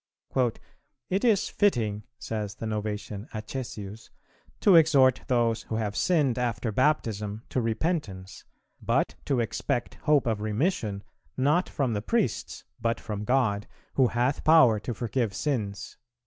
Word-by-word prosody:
"It 195 +4 +1
is 220 -4 +3
fitting," 110 - 0
says 105 -2 -4
the 115 - -6
Novatian 105 -1 -4
Acesius, 110 -2 -6 0.5
"to 195 - +6
exhort 140 -6 +5
those 115 -2 +2
who 110 - -5
have 105 -2 -2
sinned 145 -9 +2
after 115 -2 -1
Baptism 110 -5 0
to 130 - 0
repentance, 115 - -2 0.4
but - - +1
to 135 -3 +1
expect 120 +1 -2
hope 145 -2 +5
of 110 -3 -1
remission, 110 - -1 0.3
not 150 +7 +2
from 130 -5 -1
the 105 - -1
priests, 210 - -1 0.2
but 115 0 0
from 105 -2 -5
God, 115 -5 +1 0.3
who 130 -2 +4
hath 125 +4 0
power 140 -9 +6
to 115 +2 -5
forgive 115 -2 -1
sins." 105 -9 -3
115 Hz, 135 wpm, -27 LUFS, 105-135 Hz, 0.5 s, to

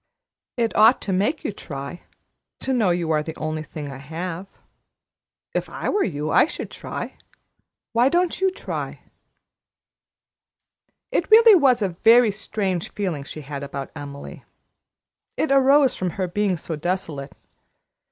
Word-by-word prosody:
It 230 -2 0
ought 220 +4 +6
to 195 - -2
make 210 - 0
you - - -2
try, 140 -2 -7 0.6
to 265 - 0
know 225 -7 +2
you 175 -2 0
are 155 -1 +2
the 160 +1 -6
only 155 0 -3
thing 150 -2 -7
I 135 - -8
have. 165 +5 -6 1.1
If - - -2
I - - -3
were 410 - +2
you, 150 -4 -2
I - - +6
should - - -6
try. - - -7 0.7
Why 240 +3 +4
don't 350 +2 +1
you 380 - +4
try?" 375 - -6 2.1
It - - 0
really 450 +1 +8
was 265 - +4
a 195 - +1
very 225 +6 +5
strange 195 -4 -3
feeling 180 -9 -3
she 155 +2 -8
had 140 0 -6
about 140 -1 -6
Emily. 145 -1 -9 0.9
It 310 - 0
arose 275 0 +5
from 185 - -2
her 185 -1 0
being 190 0 0
so 160 0 -5
desolate. 150 -4 -3
185 Hz, 145 wpm, -23 LUFS, 155-240 Hz, 2.1 s, really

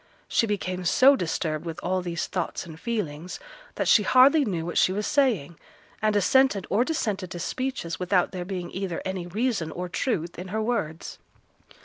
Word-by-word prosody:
She 230 - +2
became 185 -3 -2
so 260 +10 +6
disturbed 165 - -2
with 165 -2 -6
all 185 +1 0
these 170 -2 -3
thoughts 180 0 -3
and 160 -1 -11
feelings 180 -7 -4 0.4
that - - -1
she 215 - +6
hardly 260 +8 +6
knew 175 -9 -2
what 175 - 0
she - - +4
was 205 +2 -2
saying, 210 - +1 0.4
and 215 -1 +2
assented 205 0 +3
or 215 +5 +4
dissented 210 - -2
to 180 - -6
speeches 255 -4 -3
without 180 0 +1
there 180 -2 -4
being 180 -2 -5
either 190 -2 -4
any 190 -2 -3
reason 210 -3 -1
or 180 +3 -5
truth 175 - -2
in 180 - -6
her 210 +4 -2
words. 165 -9 -3
185 Hz, 175 wpm, -26 LUFS, 170-225 Hz, 0.4 s, so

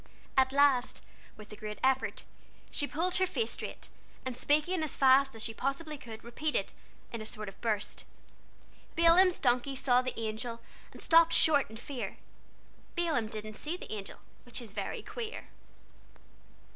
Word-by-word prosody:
At 260 0 +4
last, 275 -3 +3 0.3
with 215 0 -12
a - - -7
great 210 0 -6
effort, 265 0 +1 0.5
she 285 - 0
pulled 345 +5 0
her 375 0 +3
face 450 +5 -1
straight, - - -6 0.4
and 260 -2 -3
speaking 305 +7 +2
as 310 - -2
fast 270 -1 +5
as 225 - -3
she 225 - -2
possibly 275 +6 -2
could, 230 -5 -10
repeated, 300 +6 -2 0.4
in 230 - -3
a - - -4
sort 215 -1 -4
of 195 - -10
burst: 215 -3 -1 0.9
"Balaam's 345 +2 +6
donkey 250 +1 +1
saw 250 -1 +3
the 255 -2 -4
Angel, 230 +1 -3 0.3
And - - -4
stopped 330 0 +6
short 290 -6 +5
in 220 - -9
fear. 240 -4 -5 0.8
Balaam 320 -10 +1
didn't 215 0 -6
see 305 +10 -4
the - - -7
Angel, 200 -2 -6 0.3
Which 245 - -4
is 225 -5 -8
very - - -4
queer." 460 -2 -6
260 Hz, 160 wpm, -31 LUFS, 225-310 Hz, 0.9 s, Balaam's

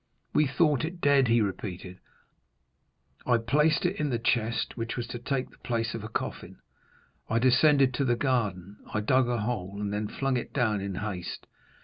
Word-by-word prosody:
"We 150 -1 +4
thought 150 0 +2
it 170 +3 -4
dead," 140 -4 +4
he 115 0 +4
repeated; 95 -2 -4 1.3
"I 120 -2 +4
placed 150 +8 +2
it - - 0
in 150 -1 0
the 120 - 0
chest, 115 0 0
which 115 -1 -4
was 120 - -2
to 120 - -5
take 130 +2 -2
the - - -22
place 115 -2 -2
of 115 - -5
a 110 - -6
coffin; - - -5 0.7
I 115 - +1
descended 130 +2 +4
to 135 +3 0
the 120 -2 +2
garden, 105 -7 -1
I 105 - -1
dug 130 +4 +3
a 120 -2 0
hole, 100 -4 -3
and 100 0 -2
then 105 +1 -1
flung 135 +3 -1
it 120 - -5
down 110 -6 +1
in 100 -1 -4
haste. 95 -3 -5
120 Hz, 190 wpm, -28 LUFS, 105-130 Hz, 1.3 s, We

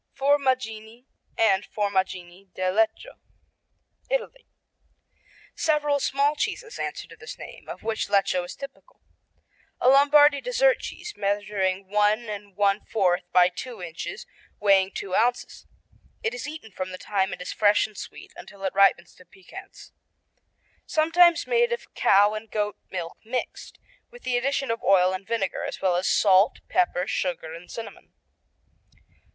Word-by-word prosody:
Formaggini, 255 -5 0 0.3
and 200 -3 +3
Formaggini 190 -3 -3
di 185 - -4
Lecco 220 - -1 0.9
Italy - - -3 1.1
Several 295 -2 +1
small 280 +2 +1
cheeses 450 +8 -4
answer - - -4
to - - -13
this 445 +1 -10
name, - - -11
of - - -8
which 220 -1 -2
Lecco 195 -3 +2
is 175 - -8
typical. 280 - -12 0.8
A 250 - +4
Lombardy 285 +1 +6
dessert - - +2
cheese 430 - -7
measuring 200 -2 -1
1 210 +2 +2 0.4
1/4 200 -2 +1
by 180 -1 +6
two 225 +5 -7
inches, 170 -2 -7 0.3
weighing 195 -2 +4
two 190 - -6
ounces. 240 +4 0 0.6
It 455 +1 -1
is - - -5
eaten 300 -8 -9
from 185 0 -5
the 185 - -6
time 190 0 -1
it - - -6
is 180 - -5
fresh 205 -1 +3
and 215 - -11
sweet - - -10
until 200 -1 -12
it 190 - -1
ripens 190 -3 +3
to 180 - -18
piquance. 195 - -13 1.0
Sometimes 335 +2 +4
made 475 0 +2
of 475 +1 -5
cow 205 +2 +4
and 215 +1 -7
goat 210 -1 -2
milk 170 -3 -6
mixed, 245 +3 -5 0.3
with 485 0 -15
the 255 - -1
addition 275 +1 0
of 230 - -3
oil 185 -1 +4
and 190 +1 -6
vinegar, 225 -4 -2
as - - -5
well 185 -2 +1
as 180 +2 0
salt, 195 0 +4
pepper, 180 0 +1
sugar 170 -3 -3
and 170 +2 -11
cinnamon. 230 -1 -9
210 Hz, 145 wpm, -25 LUFS, 190-280 Hz, 1.1 s, Lombardy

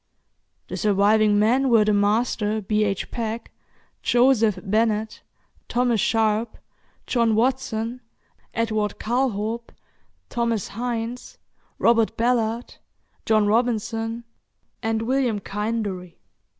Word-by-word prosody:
The - - -5
surviving 210 0 +3
men 250 +6 +3
were 225 -3 +5
the 210 - +2
master, 210 +1 +1
B. 210 +1 0
H. 195 -2 -3
Peck, 230 -1 -4 0.5
Joseph 240 -4 +3
Bennet, 215 +1 0 0.5
Thomas 240 -3 +1
Sharp, 220 0 +1 0.5
John 230 -3 +2
Watson, 245 -1 -1 0.5
Edward 215 -2 -1
Calthorp, 230 -1 -1 0.6
Thomas 230 -4 -1
Hines, 235 +1 -4 0.4
Robert 230 -1 +2
Ballard, 235 0 0 0.5
John 215 -1 +4
Robinson, 225 +1 0 0.6
and 225 0 -1
William 250 -2 +1
Kinderey. 205 -4 -4
225 Hz, 95 wpm, -23 LUFS, 210-235 Hz, 0.6 s, were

